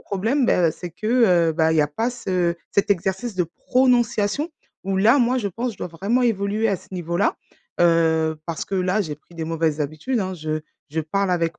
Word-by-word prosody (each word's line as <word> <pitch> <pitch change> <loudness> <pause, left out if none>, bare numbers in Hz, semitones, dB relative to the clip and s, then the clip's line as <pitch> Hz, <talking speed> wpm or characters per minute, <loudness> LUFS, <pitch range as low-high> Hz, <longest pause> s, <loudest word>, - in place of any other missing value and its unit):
problème, 225 +8 0
bah 170 -3 +3
c'est 175 +2 -8
que, 195 +6 -7 0.4
heu, - - -2
bah 160 0 +2
il - - +1
y - - +5
a 150 - +3
pas 225 +12 -1
ce 185 -8 -1 0.2
cet 200 - +1
exercice 195 +4 0
de 180 -1 +1
prononciation 245 - +1 0.3
où 195 0 -1
là, 230 +8 +5
moi 250 +1 +2
je 205 -4 -1
pense, 235 +5 -3
je - - -18
dois - - -3
vraiment 200 +9 0
évoluer 215 -1 +1
à 200 - +1
ce - - -18
niveau-là. 175 +1 0 0.4
Heu, 160 -2 +3
parce 165 -2 -3
que 195 - -4
là, 185 +3 +1
j'ai 160 -7 -3
pris 170 +3 -22
des 165 -1 -4
mauvaises 160 -2 -1
habitudes 155 - -2
hein, 185 -1 -3
je 155 -1 -3 0.3
je 160 +2 -1
parle 190 +5 -1
avec 170 -2 0
185 Hz, 210 wpm, -22 LUFS, 165-220 Hz, 0.4 s, y